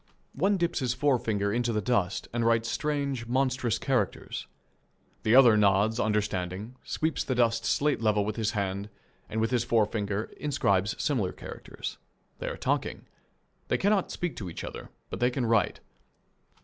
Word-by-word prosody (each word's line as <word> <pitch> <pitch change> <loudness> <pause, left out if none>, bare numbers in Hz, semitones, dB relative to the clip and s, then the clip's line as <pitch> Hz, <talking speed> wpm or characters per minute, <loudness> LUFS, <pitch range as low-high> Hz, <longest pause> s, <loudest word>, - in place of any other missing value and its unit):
One 195 +7 +2
dips 170 -1 0
his 125 -3 0
forefinger 115 -7 +1
in 120 - +1
the 115 -3 0
dust 100 -3 0
and 120 0 0
writes 115 0 +3
strange, 140 -5 -1
monstrous 130 -2 +1
characters. 125 -8 -1 0.7
The 110 +2 +3
other 125 -4 +8
nods 105 +2 +3
understanding, 105 +1 -1
sweeps 160 0 -1
the 130 - -1
dust 115 -2 +2
slate 145 -4 +2
level 105 -2 +2
with 105 0 -2
his 110 -1 -1
hand, 100 0 -2 0.4
and 110 - -2
with 110 +2 +1
his 120 -2 +2
forefinger 105 -2 0
inscribes 105 -8 +1
similar 115 -11 0
characters. - - -7 0.4
They - - -4
are - - -3
talking. - - -1 0.6
They - - +1
cannot 200 -1 +2
speak 175 -3 -3
to 95 -4 -5
each 80 - -7
other, - - -7 0.2
but 95 - -4
they 120 +1 +3
can 125 0 -1
write. 115 -2 +2
115 Hz, 160 wpm, -28 LUFS, 105-130 Hz, 0.7 s, other